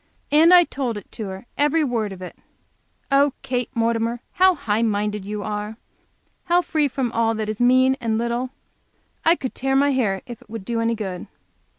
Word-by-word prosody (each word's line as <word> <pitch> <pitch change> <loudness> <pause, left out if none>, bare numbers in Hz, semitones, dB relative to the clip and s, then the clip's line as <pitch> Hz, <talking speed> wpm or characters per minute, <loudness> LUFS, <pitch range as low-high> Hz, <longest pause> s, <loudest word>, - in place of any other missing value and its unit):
And 320 +4 +6
I 355 -1 +9
told 260 -8 -3
it 205 - -11
to 220 -3 -6
her, 190 +2 -8
every 295 +2 +3
word 230 -6 -1
of 185 -1 -8
it! 180 - -8 0.8
Oh, 280 0 +4
Kate 250 -2 -2
Mortimer, 230 +1 0
how 375 0 +4
"high 220 -7 -1
minded" 210 -2 -1
you 210 0 -4
are! 210 +1 -4 0.7
How 355 0 +3
free 310 -3 +1
from 255 -2 -2
all 225 -1 +1
that 215 -1 -3
is 215 - -4
"mean 255 +2 +5
and 225 -2 0
little"! 235 +2 -1 0.7
I 330 - +5
could 260 -6 -5
tear 270 +1 -1
my 285 +1 +4
hair 215 -8 0
if 240 -3 -9
it - - -20
would 220 -3 -7
do 230 +1 -1
any 230 0 +1
good? 190 -5 -5
235 Hz, 195 wpm, -22 LUFS, 215-270 Hz, 0.8 s, I